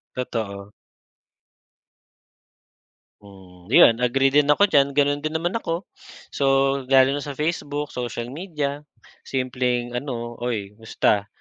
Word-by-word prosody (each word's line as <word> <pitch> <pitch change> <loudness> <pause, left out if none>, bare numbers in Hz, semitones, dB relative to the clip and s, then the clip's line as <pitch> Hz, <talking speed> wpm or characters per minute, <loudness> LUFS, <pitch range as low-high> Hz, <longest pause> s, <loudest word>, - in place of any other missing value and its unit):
Totoo. 105 -5 -5 2.5
Hmm. 95 -3 -16
‘Yon, 115 0 +6
agree 135 +2 +2
din 145 +1 +4
ako 150 +7 +4
diyan. 140 -1 +5
Ganun 145 0 +2
din 155 +2 -4
naman 170 +2 -1
ako. 185 -4 -3 0.5
So, - - -3 0.4
lalo 135 0 +5
na 145 - -2
sa 145 -2 -6
Facebook, 150 -1 -3
social 120 -1 -5
media. 150 -3 -4 0.5
Simpleng 125 -2 -1
ano, 120 -2 -5
"Uy 110 -5 -3
musta? 105 -2 0
130 Hz, 115 wpm, -23 LUFS, 115-145 Hz, 2.5 s, Yon